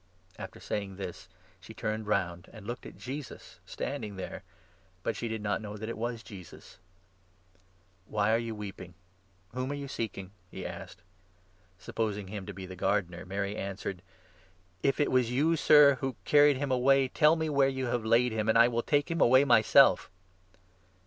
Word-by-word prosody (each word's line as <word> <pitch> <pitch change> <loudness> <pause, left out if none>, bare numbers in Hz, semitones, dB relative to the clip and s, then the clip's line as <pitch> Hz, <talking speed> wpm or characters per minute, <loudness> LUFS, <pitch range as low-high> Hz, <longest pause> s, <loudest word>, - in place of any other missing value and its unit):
After - - -8
saying 100 -2 -4
this, 95 -2 -7 0.3
she - - -13
turned 110 0 -3
round, 90 -4 -1
and 110 -3 -12
looked 120 +3 -6
at - - -12
Jesus 135 +2 -8
stand - - -4
14 - - -8
ing 105 -1 -8
there, 95 - -7 0.6
but - - -1
she 120 - -4
did 110 -1 -4
not 100 -1 -1
know 105 -1 -7
that 110 +2 -6
it - - -4
was 115 0 -4
Jesus. 95 -2 -12 1.3
"Why 105 0 +1
are 115 - +3
you 115 -1 -4
weeping? 95 -4 -8 0.6
Whom 130 +1 -3
are - - -2
you 140 -1 -6
seeking?" 100 -6 -5 0.2
he - - -8
15 - - -6
asked. - - -13 0.8
Supposing 105 0 -3
him 100 -2 -6
to 100 - -6
be 95 0 -8
the 95 0 -9
gardener, 90 -2 -1
Mary 100 +1 -3
answered: 95 -2 -5 0.4
" 95 - -32 0.3
If 135 +1 +1
it 145 - +2
was 125 -2 +3
you, 150 +7 +2
Sir, 150 -3 +6
who 135 -2 -2
carried 145 -1 +5
him 140 0 -2
away, 135 +1 +4
tell 150 +5 +4
me 160 -1 -1
where 140 -2 +3
you 130 -1 -3
have 120 -1 -1
laid 115 +2 +3
him, 110 0 -1
and 110 - +4
I 120 +1 +7
will 120 -1 0
take 145 +5 0
him 165 - -1
away 130 +3 +6
myself." 115 -5 +5
110 Hz, 190 wpm, -30 LUFS, 100-130 Hz, 1.3 s, I